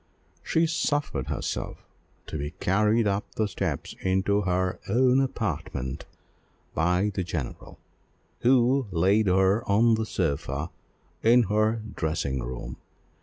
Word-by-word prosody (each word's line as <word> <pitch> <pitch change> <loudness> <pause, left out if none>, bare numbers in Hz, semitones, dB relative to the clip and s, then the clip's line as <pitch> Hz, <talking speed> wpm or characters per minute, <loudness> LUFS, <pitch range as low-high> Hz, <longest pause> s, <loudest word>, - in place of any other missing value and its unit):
She 165 +1 +2
suffered 145 - -1
herself - - -4 0.4
to - - -7
be 75 +1 -5
carried 105 +4 +2
up 100 0 +1
the 110 - +1
steps 95 - -3
into 95 +2 +1
her 90 -1 0
own 125 +4 +4
apartment 65 - -3 0.7
by 90 +6 +1
the 95 - -1
general, 80 -6 -5 0.6
who 130 +1 +3
laid 95 +4 +3
her 95 +4 +3
on 115 +3 +5
the 110 0 0
sofa 75 -3 -2 0.5
in 120 +2 +5
her 110 +2 +1
dressing 75 -5 -2
room. - - -6
100 Hz, 120 wpm, -26 LUFS, 85-115 Hz, 0.7 s, on